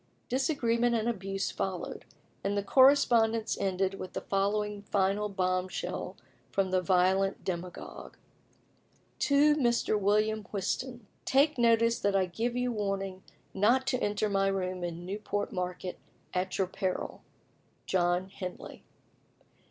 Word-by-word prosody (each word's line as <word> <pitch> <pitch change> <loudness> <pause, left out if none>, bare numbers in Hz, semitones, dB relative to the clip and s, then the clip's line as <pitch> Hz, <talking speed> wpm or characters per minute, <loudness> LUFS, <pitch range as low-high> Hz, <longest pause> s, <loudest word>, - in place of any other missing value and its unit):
Disagreement 240 -3 +1
and 225 0 0
abuse 195 -3 -2
followed, 185 -2 -4 0.4
and 200 +1 0
the 200 - 0
correspondence 230 -3 +4
ended 195 0 -1
with 185 - -7
the - - -3
following 205 +1 -1
final 200 +1 0
bomb 185 -1 0
shell - - -5 0.3
from 195 -1 0
the 185 0 +2
violent 190 +2 +2
demagogue: 180 -1 -6 1.0
"To 295 +1 +4
Mr. 235 -5 +2
WILLIAM 210 +1 +1
WHISTON, 235 +5 -3 0.2
"Take 280 +1 +3
notice 230 0 +4
that 200 -1 +1
I 190 -1 +3
give 225 +7 -2
you 250 0 0
warning 195 -3 -3 0.3
not 235 +7 +3
to 255 - 0
enter 205 +1 0
my 195 -1 +1
room 185 -2 -2
in 175 0 -5
Newport 205 +1 -3
Market, 180 0 -4 0.3
at 185 0 -1
your 190 - +2
peril. 185 0 -3 0.6
"JOHN 180 0 +1
HENLEY." 185 -1 -8
200 Hz, 130 wpm, -30 LUFS, 185-230 Hz, 1.0 s, correspondence